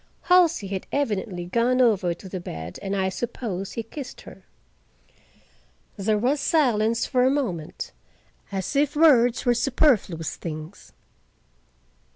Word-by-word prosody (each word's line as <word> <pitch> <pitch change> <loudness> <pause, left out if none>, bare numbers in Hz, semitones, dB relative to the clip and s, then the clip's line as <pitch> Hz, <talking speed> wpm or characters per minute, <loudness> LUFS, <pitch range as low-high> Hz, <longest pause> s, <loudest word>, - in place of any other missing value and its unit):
Halsey 350 - +4
had 195 -1 -4
evidently 205 -9 -2
gone 235 +7 +1
over 210 -8 +3
to 190 - -12
the 185 0 -5
bed 80 - -7
and 195 0 -2
I 190 -1 +1
suppose 195 -2 -4
he 230 - -3
kissed 270 +4 -9
her. - - -13 1.5
There 210 +2 0
was 260 +7 +1
silence 235 -7 +2
for 250 -2 +2
a 260 - +4
moment, 205 - -3 0.6
as 195 +6 -3
if 290 +1 +2
words 260 -7 +4
were 245 - +4
superfluous 235 - +1
things. 155 +2 -8
225 Hz, 130 wpm, -24 LUFS, 190-260 Hz, 1.5 s, Halsey